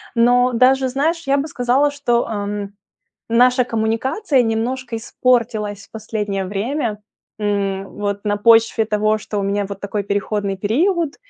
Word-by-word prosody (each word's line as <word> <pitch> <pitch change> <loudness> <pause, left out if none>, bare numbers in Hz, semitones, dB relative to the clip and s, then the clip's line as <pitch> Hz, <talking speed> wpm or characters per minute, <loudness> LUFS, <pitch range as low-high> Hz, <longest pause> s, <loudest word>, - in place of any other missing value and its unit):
Но 245 +2 +4
даже, 260 +2 +3
знаешь, 315 +5 -1
я 275 +1 +3
бы 280 +2 -1
сказала, 265 +1 +1
что, 245 -5 0
ам, 205 -2 -4 0.6
наша 250 +2 +4
коммуникация 245 - 0
немножко 235 +2 -2
испортилась 225 -4 -1
в - - -49
последнее 210 -3 -3
время. 215 +4 -2 0.4
М. 195 -2 -1
Вот 200 0 -4
на 205 0 0
почве 225 +1 +4
того, 215 0 +1
что 210 -1 -4
у - - -2
меня 200 +1 -1
вот 200 -1 -6
такой 200 0 -3
переходный 200 0 -2
период, 315 - 0
225 Hz, 145 wpm, -19 LUFS, 205-255 Hz, 0.6 s, Но